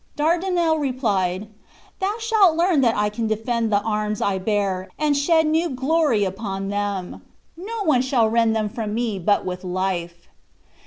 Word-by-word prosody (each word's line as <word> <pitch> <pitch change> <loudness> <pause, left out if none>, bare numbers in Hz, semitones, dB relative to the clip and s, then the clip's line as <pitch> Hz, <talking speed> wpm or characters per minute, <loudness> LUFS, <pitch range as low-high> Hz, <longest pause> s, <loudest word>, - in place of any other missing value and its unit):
Dardinel 335 +1 +1
replied: 210 -8 -1 0.5
"Thou 390 +2 -1
shalt 440 -7 +3
learn 340 -4 +3
that 235 -3 +2
I 210 0 +1
can 225 +2 -3
defend 225 +1 -1
the 205 0 +3
arms 210 -1 -1
I 195 -1 0
bear, 195 -2 -1
and 300 -1 +1
shed 320 +3 +3
new 320 +3 +1
glory 270 -3 +1
upon 195 0 -4
them. 205 -3 -3 0.3
No 415 +6 -5
one 295 -8 +3
shall 255 -3 +2
rend 225 0 +2
them 215 -1 0
from 210 0 -4
me 225 -4 -1
but 205 +4 +1
with 180 0 -5
life." 180 -2 -3
225 Hz, 160 wpm, -22 LUFS, 200-310 Hz, 0.5 s, shalt